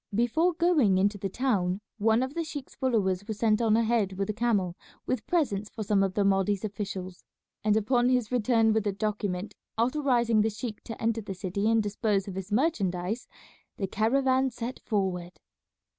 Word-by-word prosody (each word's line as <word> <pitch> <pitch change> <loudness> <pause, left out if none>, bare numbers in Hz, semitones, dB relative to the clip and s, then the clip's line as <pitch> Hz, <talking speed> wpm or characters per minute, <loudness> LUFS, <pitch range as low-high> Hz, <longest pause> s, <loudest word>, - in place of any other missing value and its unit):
Before 315 - +2
going 315 - +3
into 200 +2 +1
the 195 - -2
town 195 -6 0 0.2
one 220 +3 +3
of 260 +2 -4
the 335 - -1
sheik's 290 -4 -7
followers 205 -8 0
was 220 -2 -4
sent 215 0 +2
on 220 -1 +3
ahead 225 -4 +1
with 195 +2 -2
a - - -7
camel 205 -6 0 0.3
with 255 - -2
presents 215 - 0
for 220 - -5
some 205 -1 +2
of 195 -1 0
the 205 - +2
Mahdi's 195 +1 +2
officials, 195 -3 -5 0.4
and 215 0 +3
upon 240 +3 +2
his 250 -3 +1
return 225 -2 +3
with 215 -1 0
a 200 - 0
document 205 -1 -2 0.2
authorizing 240 -3 +2
the 220 - +2
sheik 215 0 -6
to 225 - -7
enter 225 0 0
the 195 -2 -6
city 195 +3 -1
and 225 -1 +3
dispose 205 -1 0
of 195 - -5
his 190 +1 -6
merchandise 210 - 0 0.5
the 195 - -1
caravan 260 +6 +2
set 240 +1 -6
forward. 180 -5 -2
215 Hz, 180 wpm, -28 LUFS, 195-240 Hz, 0.5 s, going